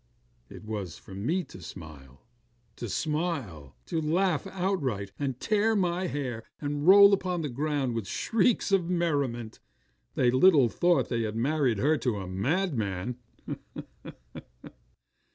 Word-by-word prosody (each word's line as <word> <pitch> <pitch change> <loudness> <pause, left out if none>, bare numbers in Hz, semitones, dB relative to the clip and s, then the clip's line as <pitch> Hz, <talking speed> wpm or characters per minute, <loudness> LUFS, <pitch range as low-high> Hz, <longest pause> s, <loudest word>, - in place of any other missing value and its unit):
It - - -11
was 105 -6 -5
for - - -13
me 155 - -1
to 95 - -13
smile. 75 -6 -11 0.5
To 120 - -5
smile! 135 - -3
To 165 - -2
laugh 175 +2 +1
outright, 160 - -2
and 135 -3 -2
tear 215 +1 +2
my 180 -1 0
hair, 130 -7 -4 0.2
and 145 +1 -3
roll 200 +1 +9
upon 180 -3 0
the 150 - -2
ground 140 -1 -1
with 115 -4 -3
shrieks 225 -1 +1
of 180 -3 +2
merriment. 140 -10 -1 0.6
They 125 -1 +3
little 135 -2 +5
thought 175 +8 +2
they 120 -1 0
had 110 -1 -3
married 130 -1 +1
her 150 +7 +2
to 125 -4 0
a 95 - -5
madman. 115 - -2
140 Hz, 135 wpm, -28 LUFS, 110-175 Hz, 0.6 s, roll